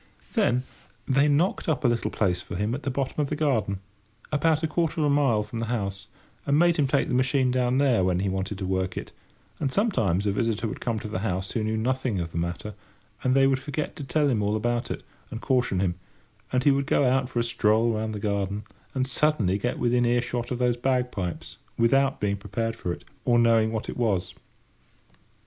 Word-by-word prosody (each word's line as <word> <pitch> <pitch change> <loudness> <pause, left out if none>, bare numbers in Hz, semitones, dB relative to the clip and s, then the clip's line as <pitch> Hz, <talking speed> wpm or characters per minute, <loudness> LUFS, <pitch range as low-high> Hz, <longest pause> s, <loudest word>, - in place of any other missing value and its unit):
Then 125 +1 +2 0.4
they 140 +2 +4
knocked 160 +5 +1
up 155 -2 0
a - - +7
little 120 -1 0
place 90 -4 0
for 100 - -7
him 105 +5 -1
at 140 - -3
the 140 - -2
bottom 135 +2 -2
of 140 - -1
the 150 - -1
garden, 115 -10 0 0.5
about 160 +1 +2
quarter 165 +1 -1
of 150 - +2
a 145 - +3
mile 135 -7 +3
from 110 +2 -6
the 115 - -1
house, 100 -3 -3 0.4
and 140 0 +2
made 170 +1 +4
him 145 -3 +3
take 140 +1 +1
the - - -2
machine 130 0 +2
down 125 0 +1
there 130 -8 +3
when 90 0 +1
he 100 - 0
wanted 95 +1 -2
to 95 - -4
work 95 0 -1
it; - - -5 0.5
and 140 -4 -1
sometimes 110 - +1
a 100 - +2
visitor 115 +2 0
would 105 - -6
come 115 -2 -1
to 110 - -5
the 100 -3 -3
house 95 -2 -2
who 110 - -1
knew 110 +1 -1
nothing 125 -2 0
of 85 -1 -4
the 85 - -2
matter, 85 +5 -4 0.5
and 130 0 +2
they 135 0 +5
would 135 -1 +2
forget 145 +3 -4
to 145 - -7
tell 145 +3 +1
him 120 -6 +1
all 105 +1 +1
about 120 +2 -1
it, - - -5 0.3
and 115 - -6
caution 125 -7 +1
him, 90 -2 +1 0.6
and 125 0 +1
he 145 - +6
would 140 0 0
go 140 - +3
out 130 0 +2
for 120 - -1
a - - +2
stroll 115 0 +2
round 110 0 -2
the - - -4
garden 100 0 -1 0.3
and 130 -1 +1
suddenly 130 -8 +1
get 125 - -1
within 120 0 +2
earshot 120 0 0
of 125 - -2
those 125 -1 +1
bagpipes, 125 -8 -2 0.2
without 135 +4 +3
being 100 -1 0
prepared 115 +3 -3
for 90 - -4
it, - - -7 0.2
or 120 -2 +3
knowing 115 -2 +4
what 110 -1 -3
it - - -5
was. 100 -7 0
120 Hz, 220 wpm, -26 LUFS, 105-135 Hz, 0.6 s, a